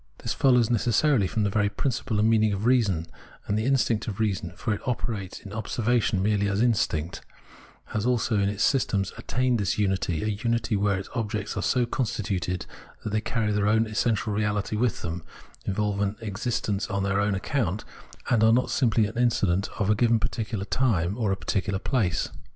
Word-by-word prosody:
This - - -1
follows 125 -4 +3
necessarily 120 0 +3
from 110 +3 -1
the 100 - +1
very 105 0 +2
principle 115 +1 -2
and 105 +1 +3
meaning 110 -2 +3
of 100 +2 -3
reason; 105 -10 +2 0.4
and 100 - -1
the 110 +1 0
instinct 125 -5 +1
of 105 -2 -4
reason 105 -4 -1
— - - -21
for 110 - -1
it 100 - -4
operates 110 -6 -3
in 100 - -10
observation 110 -2 0
merely 105 0 +2
as 100 -1 0
an 120 - +4
instinct 85 -7 -1 0.3
— - - -24
has 105 - 0
also 120 -3 +1
in 100 0 +2
its 105 +1 -1
systems 100 -8 +1
attained 125 -2 0
this 95 -5 0
unity, 95 -5 0
a - - -1
unity 110 +2 0
where 100 -1 +1
its 95 - -6
objects 105 -3 -3
are - - -1
so 125 -2 +2
constituted 95 -7 -2 0.4
that 105 - -3
they 110 +1 +1
carry 110 -1 -1
their 105 0 +1
own 110 +2 +3
essential 110 -1 0
reality 105 0 -1
with 120 0 0
them, 85 0 -4 0.4
involve 100 0 -1
an 100 +1 0
existence 105 -2 -2
on 100 -2 -1
their 100 +1 +1
own 105 -1 +1
account, 105 - -1 0.4
and 115 -4 +3
are 110 - +6
not 125 +2 +2
simply 115 -4 +3
an 110 +3 -4
incident 100 -6 +2
of 105 0 +1
a - - +6
given 115 +1 +3
particular 110 -3 -3
time, 100 -7 +1
or 110 -4 0
a 95 - 0
particular 95 -1 -1
place. 100 -4 0
105 Hz, 195 wpm, -26 LUFS, 100-115 Hz, 0.4 s, are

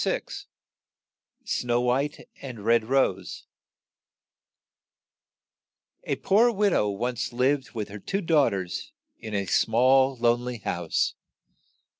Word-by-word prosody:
28 - - -3 1.0
SNOW 120 -1 0
WHITE 135 +4 -1
AND 120 -7 -8
RED 115 -1 +3
ROSE 135 +3 0 2.6
A - - -1
POOR 230 +5 +3
wid 205 -3 +1
ow 105 - +2
once 120 +5 -3
lived 135 +3 0
with 105 -2 -4
her 105 +1 -8
two 195 - -2
daugh 155 -6 +4
ters 95 -4 -5 0.3
in 110 -1 -6
a 100 -1 -1
small 130 +6 +3
lone 120 0 +2
ly 125 -1 -4
house. 85 -2 -1
125 Hz, 115 wpm, -26 LUFS, 110-135 Hz, 2.6 s, daugh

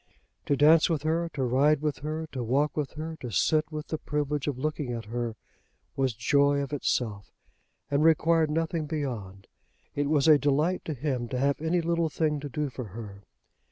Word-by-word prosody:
To 145 - +3
dance 155 +4 +6
with 155 -3 -1
her, 165 +2 0
to 135 - -1
ride 140 +4 +3
with 150 -2 0
her, 155 +3 -4
to 130 -3 -4
walk 140 +6 +1
with 150 -3 -2
her, 160 +1 -6
to 125 - -7
sit 155 - +1
with 150 -1 -6
the 155 - -2
privilege 150 -1 -2
of 140 -4 -1
looking 150 -2 -2
at 115 -1 -5
her, 115 0 -3 0.6
was 130 -4 0
joy 140 +4 +3
of 140 - -6
itself, 110 -7 -2 0.6
and 140 +1 +2
required 160 0 +4
nothing 160 0 -1
beyond. 115 - -4 0.5
It 145 0 -1
was 150 -1 +3
a 150 -2 +7
delight 150 +6 +1
to 155 - -3
him 130 -3 -2
to 125 - -3
have 140 +3 +1
any 165 +2 +1
little 170 0 0
thing 150 -1 0
to 145 0 -6
do 145 0 -2
for 125 -1 -6
her. 100 -1 -9
145 Hz, 190 wpm, -28 LUFS, 130-155 Hz, 0.6 s, a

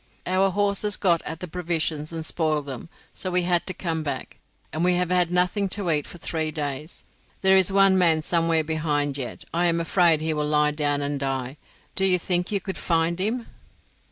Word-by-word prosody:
"Our 190 +2 +2
horses 205 +1 0
got 170 -4 +2
at 160 +1 -6
the 180 - -4
provisions 160 -3 -2
and 165 -1 -5
spoiled 155 -3 0
them; 135 +3 -7 0.2
so 185 - -4
we 180 0 +1
had 175 -1 +1
to 185 - -1
come 165 -3 -2
back, 150 - -5 0.4
and 160 +2 -1
we 180 0 +3
have 180 0 0
had 180 -2 +3
nothing 180 +3 +1
to 190 -5 -1
eat 150 -2 0
for - - -10
three 160 -1 -2
days. 150 0 -5 0.4
There 190 0 +6
is 190 0 +4
one 195 -1 +5
man 160 -3 +3
somewhere 165 -1 +2
behind 150 -2 -1
yet; 130 -3 -6
I 175 +1 +2
am 170 0 +2
afraid 170 -1 +3
he 160 0 -1
will 150 -1 -1
lie 150 0 +3
down 145 -1 0
and 140 0 -2
die. 135 0 -3 0.4
Do 190 - +3
you 185 -1 +4
think 180 +1 -1
you 200 - +1
could 190 -1 -6
find 165 0 +1
him?" 225 +5 -1
165 Hz, 205 wpm, -24 LUFS, 155-180 Hz, 0.4 s, There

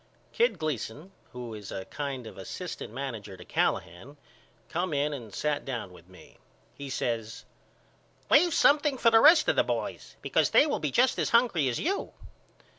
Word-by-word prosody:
Kid 475 +2 +2
Gleason 155 - -4 0.2
who 120 -2 -7
is 105 -2 -9
a 95 - -5
kind 140 -4 -5
of 110 - -10
asst. - - -7
manager 115 -6 -6
to - - -12
Callahan 105 - -2 0.5
come 175 +1 -2
in 145 +1 0
and 120 -7 -8
sat 150 +6 -2
down 120 -8 -5
with 90 0 -17
me. 90 -4 -17 0.3
He 140 -1 -8
says 115 -4 -3 0.8
Leave 350 -1 +5
something 290 -1 +4
for 230 -2 +4
the 225 - +7
rest 315 +2 +7
of - - +3
the - - +4
boys - - -4
because - - +2
they - - +5
will 300 - -1
be 150 - -1
just 250 - +2
as - - 0
hungry 230 - +3
as 120 - -2
you. 380 +6 -2
140 Hz, 175 wpm, -28 LUFS, -, 0.8 s, the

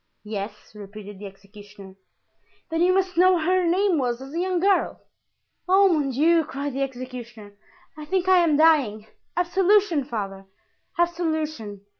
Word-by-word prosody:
"Yes," 210 0 -7
repeated 205 -1 -11
the 205 - -7
executioner. 200 0 -14 0.8
"Then 325 +1 -1
you 360 +1 +4
must 370 -2 0
know 370 +1 +5
what 340 -3 0
her 365 0 +2
name 365 -1 +2
was 245 -2 -1
as 270 +2 -10
a 335 - -2
young 365 0 0
girl." 390 +2 +1 0.7
"Oh, 390 +1 +5
mon 300 -5 +1
Dieu!" 320 +6 +3
cried 285 -2 -5
the 275 - -3
executioner, 245 -5 -7 0.4
"I 305 -1 -9
think 370 +2 -1
I 375 -1 +6
am 325 -4 +3
dying. 280 -10 +3 0.3
Absolution, 360 -2 +2
father! 195 -6 -6 0.5
absolution." 315 - -2
295 Hz, 150 wpm, -24 LUFS, 215-355 Hz, 0.8 s, I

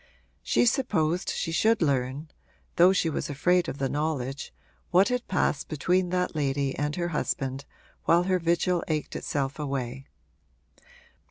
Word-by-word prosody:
She - - +2
supposed 180 - +1
she 165 - -2
should 220 +6 +3
learn, 140 0 -1 0.5
though 180 +2 +7
she 185 -3 +1
was 155 0 -2
afraid 175 +5 +2
of - - -5
the 135 - 0
knowledge, 145 -2 -3 0.4
what 185 +5 +4
had 250 -1 -2
passed 150 -6 0
between 180 +4 +1
that 180 0 0
lady 140 -2 -1
and 150 +1 -2
her 175 -1 -2
husband 135 -3 -2 0.4
while 170 +1 +4
her 185 0 +1
vigil 170 +1 +1
ached 155 -2 -2
itself 140 0 -2
away. 135 -2 -4
155 Hz, 145 wpm, -27 LUFS, 140-180 Hz, 0.5 s, though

